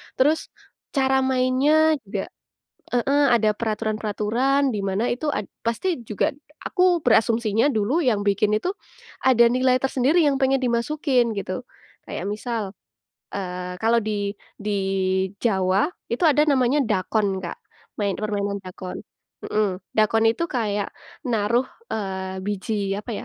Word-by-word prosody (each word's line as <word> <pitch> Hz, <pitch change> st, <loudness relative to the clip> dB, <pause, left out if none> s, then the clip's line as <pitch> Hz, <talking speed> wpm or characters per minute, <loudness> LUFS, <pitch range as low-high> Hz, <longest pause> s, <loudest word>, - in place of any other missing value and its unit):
terus 300 Hz, +4 st, +2 dB, 0.5 s
cara 265 Hz, -1 st, +3 dB
mainnya 265 Hz, +4 st, +3 dB
juga 195 Hz, -1 st, -4 dB, 0.6 s
heeh, 280 Hz, +4 st, +3 dB
ada 215 Hz, -2 st, +3 dB
peraturan-peraturan 220 Hz, +5 st, 0 dB
di 210 Hz, -, -2 dB
mana 195 Hz, +3 st, 0 dB
itu 280 Hz, +6 st, -4 dB
ad -, -, -2 dB, 0.2 s
pasti 320 Hz, -, 0 dB
juga 210 Hz, -3 st, 0 dB, 0.3 s
aku 360 Hz, -4 st, +2 dB
berasumsinya 225 Hz, 0 st, +3 dB
dulu 235 Hz, +6 st, +1 dB
yang 225 Hz, -8 st, +1 dB
bikin 205 Hz, +1 st, +2 dB
itu, 355 Hz, +12 st, -2 dB, 0.5 s
ada 255 Hz, -3 st, +5 dB
nilai 255 Hz, +1 st, +3 dB
tersendiri 270 Hz, +6 st, +3 dB
yang 275 Hz, -2 st, +2 dB
pengen 265 Hz, 0 st, +3 dB
dimasukin 245 Hz, -1 st, +1 dB
gitu, 195 Hz, +3 st, -3 dB, 0.5 s
kayak -, -, -5 dB
misal, 210 Hz, 0 st, -3 dB, 0.6 s
eee, 180 Hz, -2 st, -4 dB
kalau 230 Hz, +1 st, +4 dB
di 205 Hz, -2 st, -1 dB, 0.3 s
di 210 Hz, -, -2 dB, 0.7 s
Jawa 195 Hz, +1 st, +2 dB, 0.2 s
itu -, -, -2 dB
ada 295 Hz, 0 st, +4 dB
namanya 270 Hz, -1 st, +3 dB
dakon, 195 Hz, -1 st, 0 dB
Kak, 170 Hz, -, -5 dB, 0.4 s
main 200 Hz, -2 st, 0 dB
permainan 205 Hz, -1 st, -2 dB
dakon, 185 Hz, -1 st, -8 dB, 0.5 s
mmm, 200 Hz, -3 st, 0 dB, 0.2 s
dakon 220 Hz, +1 st, +3 dB
itu 230 Hz, +9 st, 0 dB
kayak 210 Hz, -9 st, -1 dB, 0.4 s
naruh, 235 Hz, 0 st, +1 dB, 0.3 s
eee, 190 Hz, -2 st, -3 dB
biji 205 Hz, 0 st, -2 dB
apa 225 Hz, -, -9 dB
ya, -, -, -6 dB
225 Hz, 130 wpm, -23 LUFS, 205-265 Hz, 0.7 s, ada